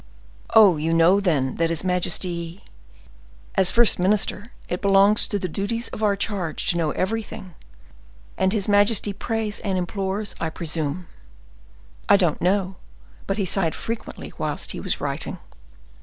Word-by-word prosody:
"Oh! 205 -7 +7
you 160 +2 -1
know, 170 +4 +5
then, 150 -9 0
that 165 0 +1
his 165 0 -2
majesty—" 180 0 -1 0.9
"As 190 -2 +3
first 235 -5 +4
minister, 205 +4 0 0.2
it 180 - -3
belongs 200 +1 +4
to 205 - -1
the 185 - -3
duties 205 +7 -3
of - - -8
our 205 -2 +3
charge 195 -5 -2
to - - -4
know 165 -2 +1
everything. 205 +1 -3 0.8
And 190 0 +1
his 205 -2 -1
majesty 205 0 +3
prays 220 +1 -3
and 195 -2 -2
implores, 195 +3 -2
I 165 - -1
presume." 160 0 -4 1.0
"I 200 - +7
don't 175 -6 0
know, 190 0 0 0.5
but 195 - -1
he 200 - 0
sighed 180 -3 +1
frequently 230 0 -6
whilst - - -3
he - - -6
was - - -2
writing." - - -4
190 Hz, 150 wpm, -23 LUFS, 175-205 Hz, 1.0 s, Oh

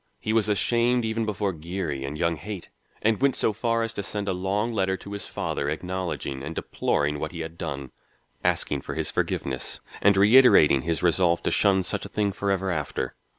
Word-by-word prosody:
He 110 - -2
was 110 -2 +3
ashamed 120 +3 +2
even 110 0 -1
before 100 -2 -1
Geary 80 -4 -4
and 70 +3 -5
young 85 0 +1
Haight, 95 +3 -7 0.3
and 110 +1 +2
went 140 -1 +3
so 110 - +1
far 115 +2 0
as 115 0 -4
to 100 - -3
send 100 +1 -4
a 95 - +1
long 100 +5 -1
letter 95 -2 0
to 100 - -11
his 100 -1 -4
father 70 - -2
acknowledging 90 -4 -3
and 75 +4 -6
deploring 75 0 -1
what 75 - -3
he 85 - -6
had 80 0 -6
done, 70 -6 -5 0.5
asking - - +1
for - - -6
his - - -1
forgiveness 65 -2 -2 0.2
and 100 0 +5
reiterating 100 - +7
his 80 +4 -1
resolve 85 0 +3
to - - 0
shun 95 -2 +3
such 95 +2 -3
a - - -7
thing 105 -1 0
forever 95 -1 -1
after. 75 -5 -3
95 Hz, 195 wpm, -26 LUFS, 80-105 Hz, 0.5 s, reiterating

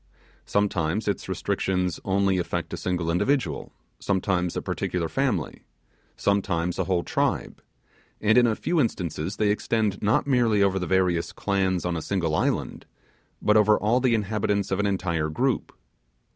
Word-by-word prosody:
Sometimes 100 -1 0
its 100 - -2
restrictions 90 -3 -1
only 95 -1 +1
affect 90 - -3
a - - -3
single 90 -2 -1
individual 90 - 0 0.3
sometimes 95 -2 0
a - - -1
particular 85 -2 -2
family 115 - -1 0.6
sometimes 95 -4 0
a 95 - +1
whole 90 -2 0
tribe; - - -1 0.6
and 110 +1 +3
in 125 -1 +6
a 110 - +1
few 170 +5 0
instances 90 - -2
they 105 -1 +2
extend 105 -1 0
not 105 +3 +2
merely 120 -7 +3
over 95 -1 +2
the 90 - -3
various 90 -3 +1
clans 95 -3 0
on 90 -1 -1
a 80 - -3
single 85 -3 -1
island, - - -1 0.6
but 105 - +4
over 105 0 +5
all 115 +4 +2
the 125 -2 +2
inhabitants 105 -2 -1
of 95 - 0
an 105 - +2
entire 85 -5 -1
group. 125 - -1
95 Hz, 155 wpm, -25 LUFS, 90-105 Hz, 0.6 s, in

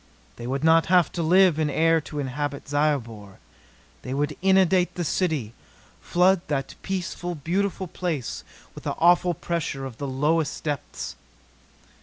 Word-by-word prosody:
They 120 - -6
would 135 +3 -2
not 160 0 +5
have 180 -3 +4
to 170 - -3
live 175 0 +4
in 155 -1 +1
air 165 +2 +3
to 150 - -9
inhabit 145 +1 -3
Zyobor. 120 -9 -1 0.6
They 130 - -5
would 145 +1 -1
inundate 190 -1 +3
the 175 - -2
city 155 - -1 0.5
flood 180 +1 +3
that 135 -2 -2
peaceful, 175 -2 -4
beautiful 185 +6 -1
place 160 -7 -4 0.3
with - - -12
the - - -1
awful 175 +1 +3
pressure 150 -5 -3
of 125 -4 -9
the 140 - -3
lowest 150 +4 0
depths! 145 -3 -4
160 Hz, 145 wpm, -25 LUFS, 140-175 Hz, 0.6 s, not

